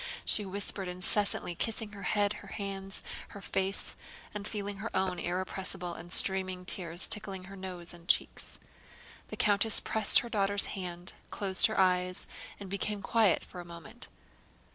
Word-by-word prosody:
she 210 - +8
whispered 195 0 -2
incessantly, 180 +1 +1
kissing 220 +3 -2
her 200 -1 -9
head, 205 +1 +1
her 200 - -12
hands, 195 -1 -5 0.2
her 200 - -10
face, 195 0 -2 0.4
and 210 -1 -4
feeling 205 -2 -4
her 215 +4 -4
own 190 -1 +1
irrepressible 180 0 -3
and 175 +1 -10
streaming 185 -1 +5
tears 175 -2 0
tickling 195 -3 +2
her 195 +2 -10
nose 185 -2 -7
and 170 0 -15
cheeks. - - 0 0.7
The - - -7
countess 210 +1 +4
pressed 220 - +4
her 235 - -7
daughter's 200 -2 +1
hand, 180 -1 -5 0.2
closed 190 -2 +3
her 220 - -2
eyes, 180 0 +2 0.3
and 200 - -7
became 200 +1 -2
quiet 220 -4 +3
for 180 - -10
a - - -6
moment. 175 +8 -8
195 Hz, 155 wpm, -31 LUFS, 180-205 Hz, 0.7 s, she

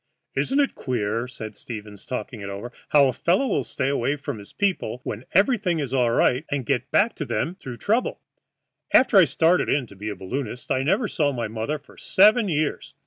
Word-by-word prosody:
"Isn't 275 +2 0
it 280 - +2
queer," 115 -2 -2
said 110 -4 -8
Stevens, 105 -3 -9
talking 125 -3 -5
it 100 - -5
over, 100 +5 -6 0.2
"how 145 -2 +6
a 130 - 0
fellow 180 - +2
will 140 - 0
stay 130 - -2
away 140 0 +1
from 140 -5 -6
his 100 - -12
people 185 - -1
when 110 +4 -5
everything 195 -3 +3
is 140 -4 -3
all 125 -3 +3
right, 125 +3 +2
and 140 -3 -2
get 130 -1 -1
back 220 +3 +3
to - - -2
them 170 - -1
through 130 -10 -9
trouble? 225 - 0 0.8
After 255 -5 +6
I 185 - +8
started 165 +5 +2
in 140 -3 +1
to 100 - -15
be 105 +3 -5
a 105 - -4
balloonist 120 +6 -5
I 130 - +2
never 195 - +1
saw 150 -7 +1
my 120 -4 -3
mother 110 +7 -3
for 150 - -20
seven 210 +2 +4
years. 155 -2 -2
135 Hz, 205 wpm, -24 LUFS, 115-175 Hz, 0.8 s, I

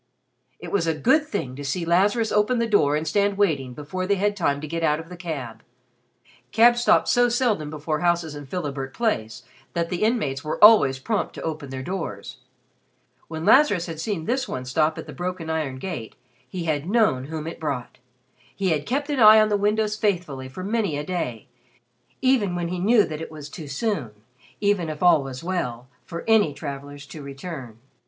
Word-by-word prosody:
It - - -9
was 180 -5 +1
a 160 - +1
good 275 - +3
thing 130 - -4
to 145 - -7
see 155 +5 -2
Lazarus 205 +6 +2
open 210 +4 +2
the 235 - +1
door 155 -10 +3
and 155 +1 -2
stand 200 +4 +1
waiting 140 -11 0
before 185 +6 -4
they 200 - +3
had 205 +1 0
time 145 -7 0
to 155 - -6
get 165 +2 -3
out 150 -1 +2
of 165 +1 -10
the 180 - -8
cab. 150 -10 -6 0.9
Cabs 240 +2 +5
stopped - - +4
so 245 0 +4
seldom 230 - 0
before 155 0 -3
houses 170 -2 +1
in 145 -1 -9
Philibert 140 -4 -4
Place 115 - -1 0.3
that 170 -1 0
the 180 - -3
inmates 180 - 0
were 155 - -3
always 210 -12 +8
prompt 205 +10 -2
to - - -7
open 155 -3 -4
their 130 0 -5
doors. 165 - -5 0.9
When 160 0 -5
Lazarus 200 - +5
had 165 -2 -7
seen 165 -2 -3
this 260 +4 -1
one 130 0 -5
stop 155 +5 +1
at - - -6
the - - -9
broken 175 -2 -4
iron 155 -5 -2
gate, 130 - -6 0.3
he 180 -2 -4
had 155 0 -1
known 210 - +2
whom 155 +1 -5
it 165 - -6
brought. 140 -8 -4 0.6
He 190 +5 0
had 150 -3 -1
kept 280 +4 -1
an 285 - -1
eye 215 -1 +9
on 215 0 +4
the 205 - +2
windows 210 +1 +1
faithfully 170 - -1
for 185 +8 -8
many 205 -6 -1
a 145 - -3
day 125 - -3 0.8
even 235 -9 +2
when 175 -1 -2
he 180 0 -3
knew 215 +4 +5
that 155 0 -5
it - - -6
was 150 -2 -9
too 155 0 -8
soon, 150 - -2 0.5
even 200 -5 +1
if 155 +2 -5
all 170 -4 +6
was 135 0 -7
well, 125 -10 -3 0.2
for 170 0 -6
any 210 -10 +4
travelers 140 -1 -7
to 150 +2 -10
return. 140 -4 -8
165 Hz, 200 wpm, -24 LUFS, 145-205 Hz, 0.9 s, eye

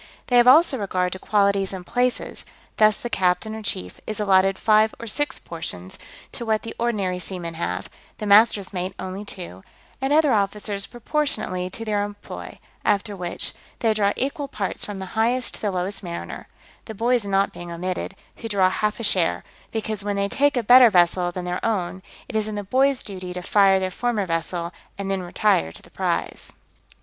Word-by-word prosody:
They 245 - +4
have 240 0 +6
also 280 0 +6
regard 185 -3 -1
to 185 - -7
qualities 200 -2 +2
and 185 -2 -7
places: 250 +3 -1 0.3
thus 215 -1 +5
the - - -5
captain, 190 0 0
or 220 - -6
chief, 90 - -3
is 215 -1 -3
allotted 195 -1 +3
five 215 0 +3
or 235 - -6
six 265 +5 0
portions, 95 - -7 0.3
to - - -5
what 220 -2 0
the 230 - -6
ordinary 200 -6 0
seamen 175 -2 -5
have: 90 - -3 0.3
the 215 - -5
master's 205 -1 +5
mate 185 +1 -3
only 190 +2 -5
two, 175 - -8 0.4
and 270 +1 0
other 300 -3 +4
officers 200 -1 0
proportionately 225 -8 -1
to 225 +4 -6
their 205 -2 0
employ: 205 0 -8 0.3
after 205 0 +1
which, 175 -2 -1 0.2
they 225 -2 +2
draw 205 -2 +2
equal 280 +2 -2
parts 205 -7 -3
from 205 -2 -5
the 190 - -5
highest 235 +3 +1
to - - -7
the 210 - 0
lowest 185 +1 -1
mariner, 170 -2 -6 0.4
the 220 - -8
boys 240 +2 +2
not 195 0 +1
being 175 0 -8
omitted, 180 +2 -4 0.2
who 225 - -6
draw 190 -3 +3
half 210 +3 -1
a - - -4
share; 175 - +1 0.3
because 215 -2 -2
when 205 0 -1
they 200 0 0
take 285 +5 +2
a 240 - +1
better 245 +2 +8
vessel 175 -2 +3
than 180 0 -5
their 180 0 -3
own, 190 -4 -1 0.3
it - - -8
is 215 -1 +1
in 215 - -4
the 205 - -3
boys' 265 +5 +2
duty 185 -3 -6
to 180 - -5
fire 195 0 +4
their 185 0 -2
former 225 0 -1
vessel, 170 +1 -2 0.2
and 195 -1 -3
then 195 -1 0
retire 175 - +1
to - - -9
the - - -18
prize. - - -2
200 Hz, 195 wpm, -23 LUFS, 185-225 Hz, 0.4 s, better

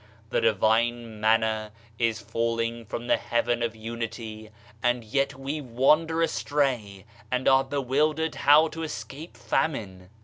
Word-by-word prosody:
The - - +1
divine 115 +1 +1
Manna 110 -1 +2 0.3
is 115 -2 +1
falling 115 +2 -2
from 115 +2 -5
the - - +3
Heaven 120 0 0
of 115 -1 -1
Unity, 110 -1 -6 0.3
and 120 -1 +1
yet 135 +4 0
we 140 +3 -4
wander 155 +6 +2
astray 125 - -1 0.2
and 125 0 -1
are 135 0 +6
bewildered 145 +4 0
how 150 +3 +5
to 165 - -7
escape 155 0 -7
famine! 95 - -2
120 Hz, 130 wpm, -26 LUFS, 110-140 Hz, 0.3 s, are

